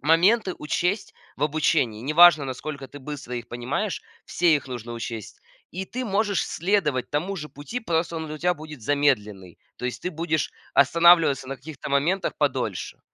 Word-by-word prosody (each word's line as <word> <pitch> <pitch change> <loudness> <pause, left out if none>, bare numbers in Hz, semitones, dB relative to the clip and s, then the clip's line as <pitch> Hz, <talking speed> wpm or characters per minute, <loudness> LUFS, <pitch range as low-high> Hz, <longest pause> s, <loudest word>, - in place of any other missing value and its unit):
моменты 185 - +3
учесть 175 +7 -1 0.2
в 140 - -5
обучении. 150 -7 +1
Не 145 +6 -3
важно, 170 -3 +8
насколько 135 +1 -6
ты 145 - -10
быстро 135 -3 -7
их 120 -1 -6
понимаешь, 130 - -3 0.2
все 175 -3 +3
их 140 -3 -2
нужно 120 -2 -6
учесть. 115 -2 -6 0.3
И 185 +3 -4
ты 255 +7 -5
можешь 205 -2 +1
следовать 165 -8 0
тому 175 +7 -1
же 150 -2 -6
пути, 145 - -6
просто 170 -4 -1
он 160 - -4
для 155 0 -6
тебя 180 +2 +2
будет 155 -4 -10
замедленный. 105 -9 0 0.2
То - - -8
есть 120 -2 -3
ты 180 - -2
будешь 160 -1 -1 0.2
останавливаться 160 -1 +5
на 135 - -4
каких-то 140 +2 -9
моментах 155 +8 +1
подольше. - - -1
150 Hz, 170 wpm, -25 LUFS, 130-175 Hz, 0.3 s, важно